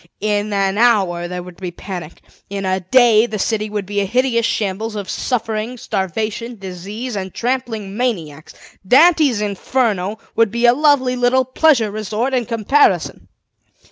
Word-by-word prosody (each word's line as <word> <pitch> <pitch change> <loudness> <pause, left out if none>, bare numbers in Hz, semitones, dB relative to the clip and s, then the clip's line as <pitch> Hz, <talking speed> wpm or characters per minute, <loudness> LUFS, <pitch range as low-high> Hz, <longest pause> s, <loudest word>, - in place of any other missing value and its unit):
In 210 0 -1
an 195 0 0
hour 190 -8 +2
there 180 0 -5
would 180 -1 -12
be 185 - -6
a - - -5
panic; 175 -3 -8 0.3
in 200 -1 -4
a 185 0 0
day 230 +3 +4
the 215 - -4
city 215 +1 -1
would 205 -2 -3
be 205 +1 -2
a - - 0
hideous 235 +1 +1
shambles 215 +2 -2
of 200 -2 -5
suffering, 230 0 -2
starvation, 220 +3 -3
disease, 200 +6 -6
and 190 -1 -4
trampling 230 -5 -3
maniacs. 170 - -3 0.3
Dante's 285 - +5
Inferno 210 -1 -1 0.2
would 230 -1 +3
be 235 +3 0
a 240 - +7
lovely 275 -3 +2
little 250 +1 +2
pleasure 255 -4 +2
resort 215 +5 -2
in 245 -3 0
comparison. 215 - +1
215 Hz, 155 wpm, -18 LUFS, 195-245 Hz, 0.3 s, a